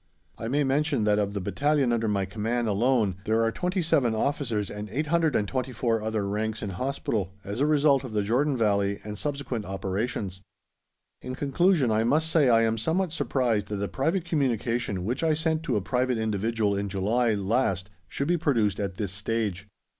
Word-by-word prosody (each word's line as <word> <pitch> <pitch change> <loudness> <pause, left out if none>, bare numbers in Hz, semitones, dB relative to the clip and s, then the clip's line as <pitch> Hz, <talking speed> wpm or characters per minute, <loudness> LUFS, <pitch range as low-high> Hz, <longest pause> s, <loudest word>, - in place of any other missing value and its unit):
I 115 - -4
may 145 +5 +1
mention 140 -2 +1
that 105 0 +3
of 100 0 -1
the - - 0
Battalion 140 +5 +1
under 115 -1 0
my 100 -2 +1
command 110 +4 -2
alone 110 -2 +2
there 110 +2 +2
are 115 - +2
27 165 - +1
Officers 115 -5 -1
and 105 +1 -6
824 130 - 0
other 110 -2 -1
ranks 110 +2 -2
in 100 - -3
hospital, 105 -4 -2
as 100 +4 -5
a 145 - +3
result 145 -3 +4
of 130 - -7
the 105 -1 +1
Jordan 130 +6 +1
Valley 100 -3 +1
and 105 0 -6
subsequent 140 -2 -3
operations. 95 0 -3 0.8
In 130 - -5
conclusion 145 -1 +2
I 110 +1 +2
must 160 +7 +2
say 150 -6 +4
I 115 -1 +5
am 115 0 +1
somewhat 170 - 0
surprised 120 -9 0
that 100 -1 -3
a - - -1
private 165 - -1
communication 120 - -1
which 125 +8 -2
I 160 -1 +3
sent 160 0 0
to - - 0
a 105 - +1
private 125 +4 0
individual 110 -1 0
in 100 0 -2
July 110 +4 +1
last 95 -2 0 0.2
should 140 - -3
be 175 - +2
produced 115 - +1
at 100 -2 -2
this 100 -2 -3
stage. 105 -1 -2
115 Hz, 180 wpm, -27 LUFS, 105-140 Hz, 0.8 s, I